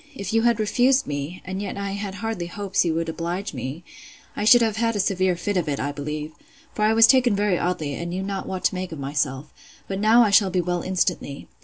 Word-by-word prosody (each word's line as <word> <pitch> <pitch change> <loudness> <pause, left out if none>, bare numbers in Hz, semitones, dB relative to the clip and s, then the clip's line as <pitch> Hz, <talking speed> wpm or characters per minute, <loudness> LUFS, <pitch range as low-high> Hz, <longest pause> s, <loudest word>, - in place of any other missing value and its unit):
If 200 -2 -5
you 225 - +3
had 235 -1 +2
refused 250 +5 +2
me, 145 +5 -5
and 190 +1 -4
yet 205 - -5
I 200 0 -3
had 200 -1 -5
hardly 210 -4 -4
hopes 200 +2 -1
you 165 -2 0
would 165 0 -1
oblige 170 +4 -4
me, 135 +6 -6 0.5
I 210 - -2
should 240 +2 +7
have 220 -2 0
had 230 0 0
a - - -1
severe 185 -2 +1
fit 205 +3 -2
of 170 -4 -1
it, 140 - -2
I 145 - -2
believe; 150 +1 -5 0.4
for 210 - -2
I 215 - +4
was 225 0 +8
taken 250 -3 +4
very 200 -3 +1
oddly, 160 -5 -2
and 170 +4 -5
knew 185 +2 -3
not 195 -1 -4
what 185 -1 -5
to - - +2
make 185 -1 -4
of 160 - -6
myself: 140 0 -3 0.3
but 195 0 -3
now 225 +3 +5
I 210 - +2
shall 200 -1 +5
be 185 0 0
well 175 0 -1
instantly. 180 -6 -2
185 Hz, 240 wpm, -23 LUFS, 165-210 Hz, 0.5 s, was